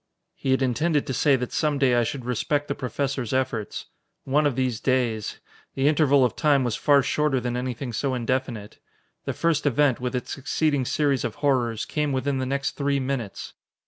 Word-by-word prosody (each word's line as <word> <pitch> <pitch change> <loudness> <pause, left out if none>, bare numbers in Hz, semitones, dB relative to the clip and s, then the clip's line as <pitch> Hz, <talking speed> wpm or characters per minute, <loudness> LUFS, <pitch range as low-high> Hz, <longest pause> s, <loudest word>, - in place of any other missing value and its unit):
He - - -5
had 130 0 +3
intended 145 +5 +1
to 130 - -3
say 140 +2 +3
that 125 -1 -3
some 150 -2 0
day 135 -3 +3
I 120 0 +3
should 125 +1 -4
respect 145 +4 -1
the - - -1
Professor's 130 0 -3
efforts. 130 -5 -2 0.4
One 145 +2 +2
of 140 - -1
these 130 -4 -1
days! 120 -5 0 0.4
The 135 +1 +2
interval 145 -3 +4
of 125 - -2
time 145 -3 +3
was 120 -3 -1
far 140 -2 +4
shorter 150 -1 +1
than 120 0 -3
anything 125 0 -4
so 130 +3 -1
indefinite. 120 -3 -3 0.5
The - - -2
first 165 -3 +1
event, 145 -1 +2
with 125 +1 -3
its 125 - -4
succeeding 145 0 0
series 140 -1 +1
of 120 - -3
horrors, 125 -6 0
came 150 -1 -1
within 135 +1 -1
the 130 - -2
next 140 +1 -1
three 140 -1 0
minutes. 130 -6 -4
130 Hz, 190 wpm, -25 LUFS, 125-145 Hz, 0.5 s, interval